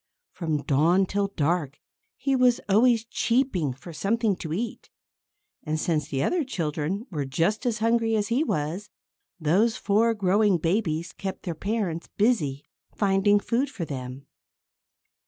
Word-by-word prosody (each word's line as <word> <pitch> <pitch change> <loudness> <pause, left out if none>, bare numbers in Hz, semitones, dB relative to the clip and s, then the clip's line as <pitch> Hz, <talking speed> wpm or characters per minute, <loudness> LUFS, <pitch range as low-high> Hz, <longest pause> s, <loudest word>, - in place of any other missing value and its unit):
From 155 -5 -2
dawn 165 +7 +3
till 200 +1 0
dark, 160 -5 -1 0.4
he 270 +1 0
was 250 -2 +4
always 225 +3 +4
cheeping 230 - 0
for 135 +7 -10
something 215 +4 0
to 160 - -6
eat. 220 +7 -4 0.7
And 155 0 -2
since 155 -3 0
the 135 -2 -1
other 355 -3 +1
children 170 - -3
were 150 -4 -2
just 170 - 0
as 235 -2 0
hungry 225 0 +2
as 210 0 0
he 250 +6 +2
was, 165 - -2 0.5
those 190 +9 +2
four 225 +3 +2
growing 200 0 +3
babies 170 -1 -1
kept 190 -1 -6
their 175 - -3
parents 190 -1 -3
busy 165 - +1 0.3
finding 200 0 +3
food 245 +6 0
for 195 -10 -5
them. 130 -1 -7
195 Hz, 140 wpm, -26 LUFS, 155-225 Hz, 0.7 s, was